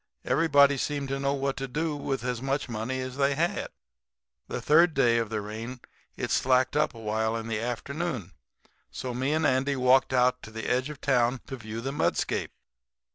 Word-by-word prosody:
Everybody 145 -3 +4
seemed 140 0 -2
to 135 0 -2
know 140 0 0
what 135 0 -1
to 135 0 -3
do 150 +4 -2
with 135 -4 -3
as 125 -1 -2
much 135 +1 -1
money 120 +3 -3
as 130 0 -6
they 140 0 +2
had. - - 0 0.8
"The - - -4
third 165 +2 +4
day 120 -4 +4
of 115 -2 -2
the 110 -1 -2
rain 115 +4 -6 0.4
it - - -3
slacked 130 +1 +2
up 150 -3 +1
awhile 110 0 -1
in 115 0 -5
the 110 -2 -1
afternoon, 125 - -3 0.6
so 125 -1 -5
me 130 +4 -1
and 155 +1 +1
Andy 135 +1 +2
walked 130 +1 +4
out 125 0 +3
to - - -10
the 110 +1 -6
edge 130 +3 +1
of 150 -2 -9
town 125 -2 +2
to 135 - -6
view 115 -2 -6
the 135 +3 -3
mudscape. 145 - 0
130 Hz, 190 wpm, -28 LUFS, 115-140 Hz, 0.8 s, Everybody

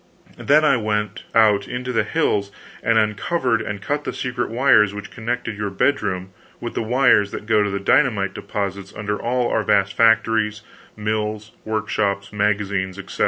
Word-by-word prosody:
Then 150 +2 +4
I 135 - +4
went 105 -2 -2
out 105 -3 +4
into 125 +1 -4
the 115 - +2
hills 105 -11 0 0.3
and 115 -2 +2
uncovered 115 - +1
and 100 -1 -5
cut 145 +1 -2
the - - -3
secret 125 -1 -3
wires 110 -4 +4
which 105 0 -8
connected 120 -1 -3
your 105 0 -3
bedroom 95 -4 -1 0.3
with - - -5
the - - -2
wires 120 -3 +3
that 105 - -7
go 110 -1 +3
to 105 - +1
the 100 0 -2
dynamite 100 -2 +2
deposits 100 -1 -5
under 105 0 -3
all 120 0 0
our 110 - +1
vast 100 -1 +2
factories, 110 -2 +2 0.3
mills, 105 0 -3
workshops, 100 -2 -2
magazines, 100 -2 -1
etc. 100 0 -9
105 Hz, 165 wpm, -21 LUFS, 100-115 Hz, 0.3 s, Then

